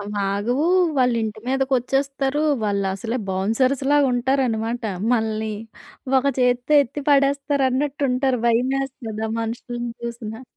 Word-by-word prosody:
అవ్వాగవు. 205 +6 -1 0.3
వాళ్ళింటి 230 -4 +1
మీదకొచ్చేస్తారు. 270 +2 0 0.2
వాళ్ళసలే 200 +3 -1
బౌన్సర్స్‌లాగా 260 +9 +2
ఉంటారన్నమాట. 245 -2 0 0.3
మనల్ని 220 -1 -1 0.7
ఒక 260 - -3
చేత్తో 250 +3 +2
ఎత్తి 285 +3 -6
పడేస్తారన్నట్టుంటారు. 275 -1 +1
భయమేస్తది 245 -2 -1
ఆ - - -4
మనుషుల్ని 240 +1 -4
చూసినా. 235 -1 -6
245 Hz, 85 wpm, -22 LUFS, 220-270 Hz, 0.7 s, బౌన్సర్స్‌లాగా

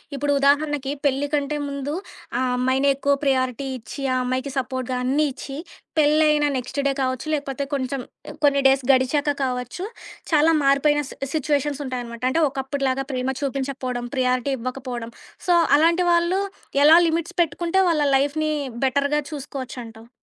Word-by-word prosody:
ఇప్పుడు 285 +1 0
ఉదాహరణకి 285 0 +2
పెళ్ళి 280 +1 +1
కంటే 295 0 0
ముందు 280 +1 -4 0.5
ఆ - - 0 0.2
అమ్మాయినే 260 +2 +2
ఎక్కువ 280 +1 +1
ప్రయారిటీ 260 -1 0
ఇచ్చి, 230 +4 -9
ఆ - - +1
అమ్మాయికి 255 +2 -2
సపోర్ట్‌గా 255 -1 -2
అన్నీ 280 +4 +2
ఇచ్చి, 270 +1 -8 0.4
పెళ్ళైన 300 0 +4
నెక్స్ట్ 260 +3 -4
డే - - +2
కావచ్చు 255 0 -1
లేకపోతే 280 -2 -2
కొంచెం 265 -1 -2 0.4
కొన్ని 280 -1 +4
డేస్ 270 -1 +3
గడిచాక 270 +3 +2
కావచ్చు, 250 +6 -3 0.5
చాలా 310 +1 +5
మారిపోయిన 280 +2 +3
సి - - -10 0.2
సిచ్యుయేషన్స్ 290 -1 0
ఉంటాయనమాట. 240 -2 -5
అంటే 325 +5 +1
ఒకప్పుటిలాగా 270 0 -2
ప్రేమ 255 0 -2
చూపించకపోడం, 265 -3 -3
ప్రియారిటీ 255 +1 +1
ఇవ్వకపోడం. 245 -2 -5 0.4
సో 355 - +5 0.2
అలాంటి 335 +3 +3
వాళ్ళు 340 +2 +2 0.4
ఎలా 315 +3 +8
లిమిట్స్ 330 +1 -2
పెట్టుకుంటే 340 +4 +1
వాళ్ళ 320 -3 +2
లైఫ్‌ని 300 +3 +1 0.3
బెటర్‌గా 280 +3 +1
చూసుకోవచ్చంటావు? 250 -5 -7
275 Hz, 135 wpm, -23 LUFS, 255-295 Hz, 0.5 s, ఎలా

